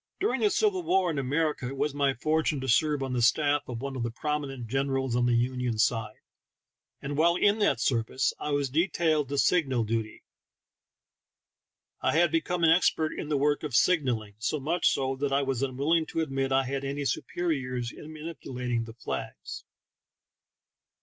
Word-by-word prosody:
During 415 +4 0
the 420 - +4
civil 405 -3 +1
war 190 - +2
in 150 - -2
America 145 0 -1
it 135 +2 -6
was 150 +1 0
my 140 -2 +1
for 155 +6 +1
tune 150 -2 -1
to 130 - -4
serve 145 +3 +2
on 130 -1 -3
the 125 - 0
staff 145 +4 +3
of 120 -1 -5
one 140 -1 -4
of 130 - -3
the 120 - -1
prominent 135 -1 -3
generals 135 0 -1
on 120 0 +2
the 120 - +3
Union 125 -1 0
side, 110 -1 0 0.9
and 140 +1 -3
while 170 +2 +4
in 205 +4 +3
that 205 - +2
serv 115 -2 0
ice 130 - 0
I - - -4
was 145 -2 0
detailed 160 -2 +1
to 140 - -2
signal 135 -7 +2
duty. 110 0 -3 1.8
I - - +1
had 170 0 +3
become 170 +2 -1
expert 160 -1 +3
in 150 - -6
the 150 - +1
work 145 +1 +1
of 145 -6 -4
signaling, 125 - +2
so 135 +7 -1
much 165 +6 +1
so 135 0 -1
that 140 0 -1
I 140 +1 +2
was 135 -2 -2
unwilling 140 +5 +1
to 165 - -2
admit 135 -3 -2
I 135 0 +3
had 135 +1 -3
any 140 +1 -3
superiors 130 -7 -2
in 155 - -11
manipulating 125 -7 -4
the 115 - -10
flags. 120 - -6
140 Hz, 185 wpm, -28 LUFS, 125-155 Hz, 1.8 s, the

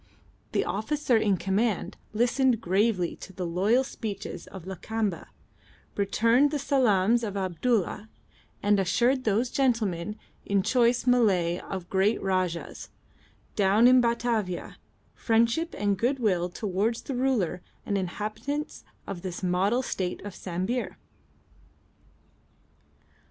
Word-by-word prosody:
The - - +1
officer 255 +5 0
in 210 -3 +2
command 200 +3 -1 0.2
listened 245 +2 +2
gravely 195 -2 +1
to 190 - -11
the 180 -1 -4
loyal 200 +9 +2
speeches 205 -8 -6
of 190 -3 -10
Lakamba, 200 +1 -3 0.7
returned 230 +7 +3
the 295 - -1
salaams 235 -5 +2
of 205 -2 -3
Abdulla, 200 +3 -1 0.5
and 205 0 +3
assured 245 +8 +2
those 225 +4 +1
gentlemen 210 -8 0 0.3
in 200 -1 +1
choice 245 +1 +2
Malay 190 -9 +3
of 190 -2 -6
the 175 - -28
great 195 +3 +2
Rajah's 185 -3 -2 0.7
down 205 +4 +5
in 255 0 +7
Batavia 235 -6 -1 0.4
friendship 230 +8 +1
and 200 -2 0
goodwill 215 -8 +1
towards 205 +4 -1
the 275 - -4
ruler 245 -9 0 0.2
and 205 - -1
inhabitants 215 - -4 0.2
of 190 -3 -6
this 185 0 -6
model 195 +8 +1
state 185 -6 -3
of 205 - -6
Sambir. 190 +7 -3
210 Hz, 115 wpm, -27 LUFS, 190-240 Hz, 0.7 s, in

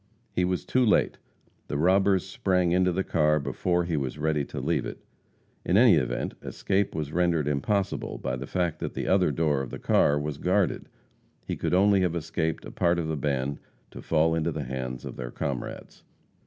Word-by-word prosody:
He 90 - +1
was 90 0 -2
too 130 - +2
late. 110 - +2 0.5
The 70 - -2
robbers 95 +3 +3
sprang 90 -2 0
into 90 +1 +3
the 95 +2 -1
car 75 -3 +2
before 85 +6 0
he 85 -1 -2
was 70 -1 -2
ready 75 -1 0
to - - -6
leave - - 0
it. - - -6 0.7
In 90 - +2
any 120 -1 +7
event, 75 -7 0
escape 100 -2 -1
was 75 -2 -3
rendered 85 -4 +1
impossible 95 +8 -1
by 65 - -3
the 65 - -6
fact 90 -3 -1
that - - -5
the - - -3
other - - +3
door 75 -4 +1
of 65 - -5
the - - -6
car 75 - +3
was 75 -1 -4
guarded. 95 0 0 0.6
He - - -3
could - - 0
only 100 +1 +4
have 90 -2 0
escaped 80 -1 -2
a - - -8
part 85 0 +1
of 80 -2 -2
the 80 - -1
band 70 -1 -2 0.3
to - - -9
fall 80 0 +2
into 80 +1 0
the 75 -2 -4
hands 65 -1 -5
of - - -7
their - - -5
comrades. 65 +1 -5
80 Hz, 195 wpm, -27 LUFS, 75-90 Hz, 0.7 s, any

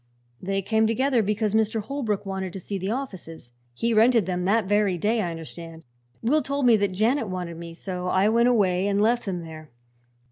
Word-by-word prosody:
"They 195 +1 -2
came 220 +2 +2
together, 250 +2 +2
because 210 0 -1
Mr. 220 0 +1
Holbrook 220 -4 -3
wanted 190 -2 -4
to 195 - -6
see 195 +2 -5
the 190 +2 -3
offices. 190 - -6 0.2
He 230 - 0
rented 225 -1 +4
them 180 -1 -2
that 210 +2 +2
very 205 -2 +1
day, 215 +6 +1
I 175 - -2
understand. 165 0 -9 0.4
Will 295 +7 +3
told 280 -1 -2
me 240 -2 +6
that 200 -2 0
Janet 225 +6 +1
wanted 180 -2 -5
me, 170 0 -9
so 180 0 -5
I 190 +2 +2
went 235 +2 +3
away 195 -5 +2
and 200 0 +1
left 235 +3 +2
them 180 -3 -2
there. 155 -2 -10
200 Hz, 200 wpm, -25 LUFS, 180-225 Hz, 0.4 s, me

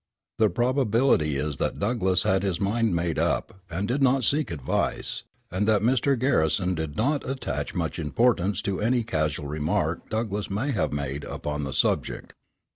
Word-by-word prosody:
The 110 -1 +5
probability 120 - +2
is 75 0 -2
that - - -1
Douglass 95 -4 +1
had 95 0 +2
his 95 -4 -1
mind 110 0 +1
made 85 -1 0
up, 95 - -1
and 95 +4 -2
did 130 +5 0
not 135 0 +3
seek 150 +5 +1
advice, 75 -7 -2 0.3
and 95 +4 0
that 105 -2 +3
Mr. 130 +3 +3
Garrison 90 - +2
did 80 -3 -4
not 140 +4 0
attach 135 0 -3
much - - -2
importance 100 +4 +1
to 100 -2 -2
any 120 +2 +2
casual 75 -8 -1
remark 75 +1 -1
Douglass 110 -2 -2
may 110 +9 -1
have 110 - 0
made 70 0 -3
upon 75 0 -4
the 70 - -4
subject. - - 0
100 Hz, 165 wpm, -26 LUFS, 80-120 Hz, 0.3 s, The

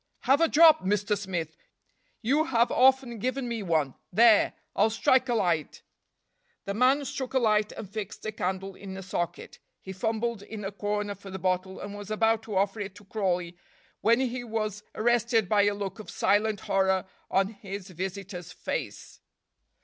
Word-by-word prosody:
"Have 275 +4 +3
a 330 - +5
drop, 315 0 +6
Mr. 205 +2 +1
Smith; 175 -6 -4 0.7
you 285 +7 +2
have 240 -5 +2
often 260 -3 +3
given 255 +3 -2
me 235 -2 -3
one 160 -8 0 0.2
there. 220 +2 +5 0.2
I'll 210 +2 +4
strike 255 +3 +2
a 240 - +2
light." 170 -7 0 0.8
The 200 - -2
man 260 +6 +3
struck 260 0 -5
a - - +6
light 215 -3 +2
and 205 - -7
fixed 205 +1 -7
a 215 - -2
candle 190 -1 -3
in 190 0 -9
a 195 - -7
socket. 175 -2 -4 0.2
He 190 - -8
fumbled 220 +3 -2
in 210 0 -7
a 195 - -3
corner 205 0 -2
for 200 0 -12
the 190 - -5
bottle, 185 0 -1
and 200 0 -7
was 205 0 -8
about 225 +1 +2
to 215 - -5
offer 195 +2 +1
it 200 -1 -5
to 205 - -15
Crawley, 180 -4 -1 0.4
when 230 +2 +3
he 250 -1 -2
was 215 -3 -3
arrested 235 -2 +2
by 205 +1 +4
a 205 0 +1
look 200 +1 -5
of 215 - -9
silent 210 0 +1
horror 190 -1 +1 0.2
on 195 0 +2
his 200 -2 -8
visitor's 185 0 -6
face. - - -5
205 Hz, 175 wpm, -28 LUFS, 190-230 Hz, 0.8 s, drop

